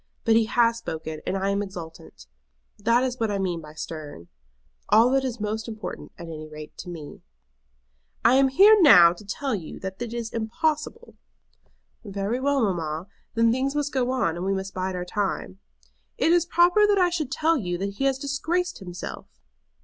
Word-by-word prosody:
But 225 -1 +4
he 225 0 +4
has 230 +1 +2
spoken, 160 -5 -6
and 195 - 0
I 195 +1 0
am 200 +1 0
exultant. 175 - -9 0.5
That 230 +4 +3
is 255 -1 -2
what 225 -1 0
I 205 - -1
mean 180 -4 -2
by 155 0 -13
stern. 150 - -8 0.6
All 225 +4 +5
that 270 0 +2
is 250 -3 -3
most 215 +2 -3
important, 220 -1 -7
at 170 - -8
any 155 -2 -8
rate 155 0 -10
to 180 - -7
me." 160 -4 -9 1.0
"I 235 - +6
am 270 +1 +5
here 395 +11 +7
now 180 - +8
to 180 - -14
tell 260 +7 -3
you 180 -7 -5
that 190 +2 -6
it 240 -2 -4
is 235 -1 -5
impossible." 305 - -2 0.9
"Very 200 +3 -3
well, 280 -1 +1
mamma. 170 -2 -2 0.3
Then 230 0 +4
things 265 +3 -1
must 295 -1 -1
go 255 -2 +1
on, 255 -11 0
and 175 - -4
we 195 +1 0
must 190 0 -5
bide 185 0 -3
our 180 0 -4
time." 180 - -3 0.6
"It 330 - +3
is 345 -1 +3
proper 355 +5 +4
that 410 -1 +3
I 360 -2 +3
should 310 -6 -2
tell 325 +3 +2
you 175 -8 -3
that 200 +2 -4
he 270 - +1
has 270 -1 +2
disgraced 320 +6 -2
himself." 180 -2 -7
220 Hz, 190 wpm, -25 LUFS, 180-270 Hz, 1.0 s, now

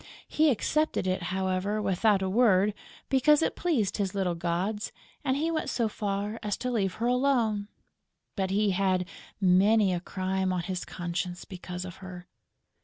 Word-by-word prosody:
He 310 0 +3
accepted 305 +1 0
it, 185 0 0
however, 190 +2 -1
without 195 0 +2
a - - 0
word, 205 -1 +4 0.3
because 295 +4 +4
it - - 0
pleased 260 - 0
his 200 -2 -2
little 190 -3 0
gods; 175 +5 -2 0.3
and 265 -1 +1
he 320 +3 0
went 315 - -1
so 230 -2 0
far 205 0 -3
as 210 -2 -2
to 250 - -3
leave 195 -6 0
her 230 - -2
alone. 245 -5 +1 0.7
But 190 -2 -1
he 205 +1 +2
had 185 -1 +1
had 180 - -6 0.3
many 195 +2 +4
a 175 - -1
crime 185 +1 -2
on 180 -1 0
his 185 0 -4
conscience 175 0 -4
because 180 -1 -7
of 180 - -8
her! 185 -2 -9
195 Hz, 170 wpm, -28 LUFS, 185-225 Hz, 0.7 s, word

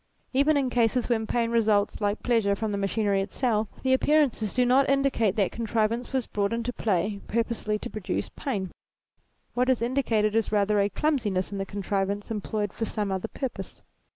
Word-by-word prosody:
Even 285 +3 +4
in 265 -3 0
cases 240 +1 +1
when 220 -2 +1
pain 230 0 0
results, 215 -3 +2
like 205 +1 -1
pleasure, 225 -5 +2
from 215 +1 -2
the 200 - -1
machinery 200 0 +1
itself, 215 +1 0 0.2
the 260 0 +3
appear 300 +3 +4
ances 220 -4 -5
do 250 0 +3
not 265 +2 +4
indicate 275 -7 +2
that 200 -3 +1
contrivance 230 +1 -1
was 260 -3 0
brought 200 +1 -1
into 235 +1 -2
play 200 -1 -1
purposely 230 -2 -1
to 225 - -6
produce 215 -5 -3
pain: 200 - -4 0.8
what 250 +1 +1
is 260 - +3
indi 255 +4 +1
cated 215 -4 +1
is 225 -2 +1
rather 210 0 +2
a 200 0 +2
clumsiness 210 -8 0
in 200 - -4
the 195 - -3
contrivance 200 +1 -2
em 210 -2 -2
ployed 210 -1 -2
for 225 - -2
some 210 -3 -2
other 190 -1 -2
purpose. 265 -3 -6
220 Hz, 190 wpm, -27 LUFS, 205-245 Hz, 0.8 s, Even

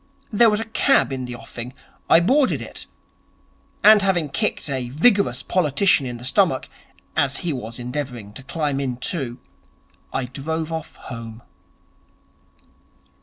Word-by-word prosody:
There 230 +2 +6
was 210 0 +1
a 225 - -3
cab 225 - +3
in 130 -1 -3
the 125 0 -6
offing. 120 +1 -8 0.4
I 165 - +7
boarded 260 +9 +3
it. - - -7 1.0
And, 215 0 +8
having 180 -6 +1
kicked - - -1
a 130 -3 -3
vigorous 200 - +3
politician 160 -3 +2
in 120 -1 -5
the 120 - -9
stomach, - - +2 0.5
as 140 -3 +1
he 165 - +1
was 115 -3 -6
endeavouring 125 -4 -5
to 120 - -9
climb 145 0 -2
in 130 -3 -2
too, 130 -3 -3 0.7
I 130 - -1
drove 160 +5 -4
off 160 -1 -5
home.' 115 -1 -9
140 Hz, 140 wpm, -22 LUFS, 125-175 Hz, 1.0 s, And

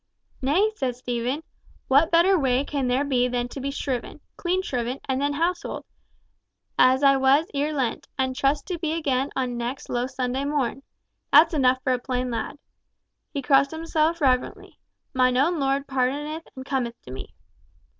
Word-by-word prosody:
"Nay," 350 +11 +2
said 260 - -2
Stephen, 250 +4 -3 0.4
"what 285 +5 +4
better 345 +3 +5
way 265 -4 +1
can 280 -3 -2
there 255 +3 +2
be 250 -3 +2
than 245 0 -1
to 270 - -7
be 275 - -2
shriven—clean 285 +7 -3
shriven—and 260 0 -2
then 285 0 +1
houselled, 340 +4 -2 0.9
as 260 +2 +4
I 275 -1 +6
was 270 +4 +4
ere 290 +2 0
Lent, 265 -6 -2
and 260 -1 0
trust 275 +3 +1
to 355 -2 -3
be 315 -1 -1
again 275 -4 0
on 250 -2 -1
next 240 +3 -4
Low 245 +1 -1
Sunday 260 0 -2
morn? 280 -2 -1 0.5
That's 320 +4 +7
enough 260 -3 +2
for 260 - +2
a 250 - 0
plain 250 0 -2
lad." 235 +5 -4 0.7
He 280 -3 -4
crossed 275 0 +4
himself 320 +1 0
reverently, 255 -3 0 0.3
"Mine 255 -1 +3
own 320 +5 +2
Lord 275 0 0
pardoneth 285 +5 -2
and 260 0 -8
cometh 250 -4 -2
to 125 - -11
me." 130 - -9
270 Hz, 165 wpm, -25 LUFS, 255-295 Hz, 0.9 s, That's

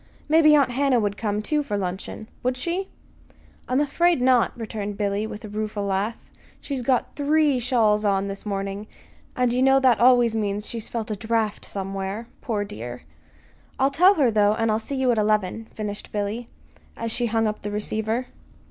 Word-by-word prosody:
Maybe 305 0 +6
Aunt 275 -4 +3
Hannah 265 -1 +2
would 205 -2 -1
come, 210 -1 -2
too, 300 +6 +1
for 210 -8 -3
luncheon. 190 +3 -5
Would 255 +1 -1
she?" 350 +8 -2 0.8
"I'm 255 +2 +2
afraid 335 +3 +2
not," 250 -1 +4
returned 210 -3 -5
Billy, 205 +1 -1
with 215 +1 -8
a - - -6
rueful 210 0 -3
laugh. 200 +3 -1 0.4
"She's 275 -3 -4
got 250 0 0
three 290 -2 +2
shawls 225 -4 +2
on 200 -1 +1
this 195 0 -6
morning, 195 0 -4 0.5
and 250 -1 +1
you 250 - +1
know 270 +1 +5
that 255 -4 +4
always 240 -2 +5
means 205 -1 -1
that - - -6
she's 230 -2 -5
felt 225 -1 -4
a - - -1
draft 220 0 -1
somewhere 195 +2 -4 0.2
poor 210 -4 -1
dear. 120 - -7 0.7
I'll 270 +1 +2
tell 360 +8 +5
her, 270 -7 +3
though, 210 -1 +3
and 225 -1 +1
I'll 215 - +1
see 250 +5 -5
you 260 -2 +2
at 230 - +1
eleven," 215 0 0
finished 210 -2 -6
Billy, 210 +3 -3 0.5
as 230 0 -3
she 240 +1 0
hung 225 0 +1
up 215 0 -2
the 205 - -4
receiver. 220 +3 -2
225 Hz, 185 wpm, -24 LUFS, 205-255 Hz, 0.8 s, Maybe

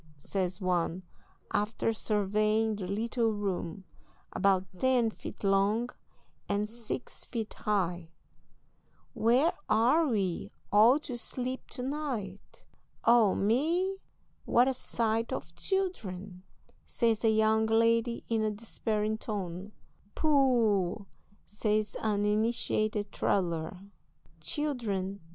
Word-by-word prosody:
says 185 +4 -3
one, 180 -1 0 0.5
after 215 +2 0
surveying 215 +1 +1
the 195 -3 -5
little 225 +3 0
room, 195 -3 -3 0.5
about 190 -2 +2
ten 250 -3 +3
feet - - -9
long 205 +5 +2 0.6
and 205 +1 0
six 230 0 -6
feet 225 -3 -4
high, 180 -5 -1 1.0
"where 250 +9 +3 0.2
are 250 +9 +4
we 195 -8 -1 0.2
all 225 +6 +7
to 290 -5 -6
sleep 255 +2 -3
to 250 - -6
night?" 255 -9 -5 0.4
"Oh, 230 -4 +5
me, 330 - +1 0.5
what 245 +2 +4
a 265 - +2
sight 230 -2 -1
of 165 +1 -5
children!" 200 - -2 0.5
says 230 -2 +1
a 225 - +5
young 220 0 +3
lady, 230 +1 +2
in 225 -1 +1
a 215 - +1
despairing 215 0 -2
tone. 195 -2 -5 0.4
"Pooh!" 230 - +2 0.4
says 210 0 -1
an 205 -2 +1
initiated 215 -1 0
traveller, 170 -2 -1 0.6
"children! 205 - -2
215 Hz, 105 wpm, -30 LUFS, 200-235 Hz, 1.0 s, all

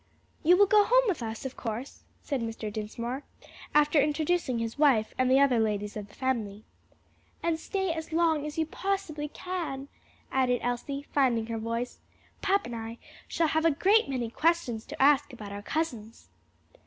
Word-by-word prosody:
"You 350 +3 +5
will 405 - +7
go 415 +1 +5
home - - +5
with 365 - 0
us, 225 +2 -5
of 265 - -5
course," 235 +3 -5 0.2
said 275 -4 -2
Mr. 225 -2 -4
Dinsmore, 235 +5 -4 0.5
after 300 0 +5
introducing 300 -2 0
his 230 +3 -4
wife 255 -8 +4
and 255 0 +2
the 265 +1 +5
other 270 -4 +4
ladies 210 -1 -1
of 210 -2 -6
the 205 - -19
family. 220 -6 -2 0.8
"And 335 -1 0
stay 385 +1 -1
as 320 0 -6
long 320 -2 +2
as 300 - -7
you 320 - +2
possibly 330 -4 -3
can," 305 -5 -5 0.4
added 250 -2 +2
Elsie, 275 +4 -3
finding 245 -5 +2
her 225 0 -4
voice. 230 +2 -3 0.4
"Papa 395 +1 +2
and 240 - -5
I 225 0 -6 0.3
shall 330 -2 +1
have 315 +2 +1
a 330 - +5
great 385 +5 +3
many 245 -4 -2
questions 305 -8 0
to - - -8
ask 285 +1 +4
about 210 -4 -8
our 200 0 -6
cousins." 230 -5 -4
270 Hz, 175 wpm, -29 LUFS, 230-320 Hz, 0.8 s, will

